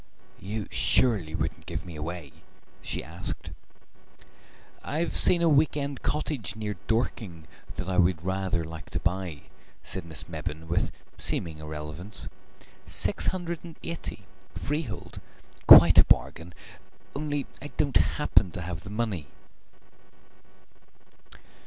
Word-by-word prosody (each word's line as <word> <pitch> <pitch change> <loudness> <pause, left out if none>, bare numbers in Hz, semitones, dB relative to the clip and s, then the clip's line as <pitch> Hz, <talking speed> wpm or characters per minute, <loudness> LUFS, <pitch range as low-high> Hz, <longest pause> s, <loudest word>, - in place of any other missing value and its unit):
"You 105 +1 -4
surely 105 -11 +3
wouldn't - - -3
give - - -4
me 85 -2 -8
away?" 75 -1 -6 0.5
she - - -3
asked. - - -4 1.3
"I've 160 +4 -1
seen 170 -1 +6
a - - +5
week 150 0 +4
end 140 -2 -3
cottage 135 -9 -2
near 105 -1 -3
Dorking 110 -8 -1 0.3
that - - -4
I 95 -1 -1
should 85 -2 +1
rather 95 -2 0
like 80 +1 -8
to - - -2
buy," 85 -4 -2 0.4
said 95 - -4
Miss 80 -2 -5
Mebbin 80 0 -5
with 85 - 0 0.3
seeming 80 -2 -2
irrelevance. 75 +6 -6 0.6
"Six - - +1
hundred 170 -3 -1
and 165 -2 -10
eighty, 165 - -5 0.3
freehold. 145 -7 -4 0.5
Quite - - +11
a - - +10
bargain, 85 0 +1 0.6
only 145 -1 -2 0.2
I 145 - -6
don't 140 -3 +1
happen 95 - +3
to 90 - -4
have 85 -1 -5
the 100 - -10
money." 105 - -2
95 Hz, 125 wpm, -28 LUFS, 85-140 Hz, 1.3 s, Quite